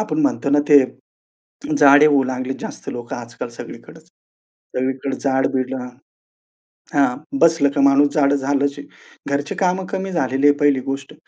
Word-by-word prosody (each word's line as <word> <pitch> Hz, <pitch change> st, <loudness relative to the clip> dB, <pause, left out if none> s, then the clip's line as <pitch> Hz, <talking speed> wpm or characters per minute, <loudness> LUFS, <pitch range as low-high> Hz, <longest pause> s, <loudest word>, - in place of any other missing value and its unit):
आपण 215 Hz, +7 st, -3 dB
म्हणतो 225 Hz, -, 0 dB
ना 145 Hz, -, +4 dB
ते 145 Hz, -3 st, +7 dB, 0.9 s
जाडे 145 Hz, -, +7 dB
होऊ 145 Hz, -3 st, +4 dB
लागली 130 Hz, 0 st, -4 dB
जास्त -, -, -8 dB
लोकं 120 Hz, -1 st, -6 dB
आजकाल 120 Hz, 0 st, -8 dB
सगळीकडच. 120 Hz, -, -12 dB, 0.7 s
सगळीकडे 130 Hz, +1 st, -2 dB
जाड-बिड 130 Hz, -1 st, -1 dB
हां. 125 Hz, -1 st, -6 dB, 1.1 s
हां, 135 Hz, -3 st, +2 dB, 0.2 s
बसलं 165 Hz, -4 st, +4 dB
का 140 Hz, -, 0 dB
माणूस 140 Hz, +1 st, +4 dB
जाडं 145 Hz, -2 st, +2 dB
झालंच 140 Hz, +1 st, -1 dB
आहे. 145 Hz, -, -10 dB, 0.5 s
घरची 145 Hz, +1 st, -3 dB
कामं 185 Hz, 0 st, 0 dB
कमी 190 Hz, -1 st, -4 dB
झालेली 135 Hz, -3 st, 0 dB
आहे 145 Hz, -, +5 dB
पहिली 145 Hz, -3 st, +2 dB
गोष्ट. 135 Hz, +2 st, -6 dB
140 Hz, 150 wpm, -19 LUFS, 130-145 Hz, 1.1 s, ते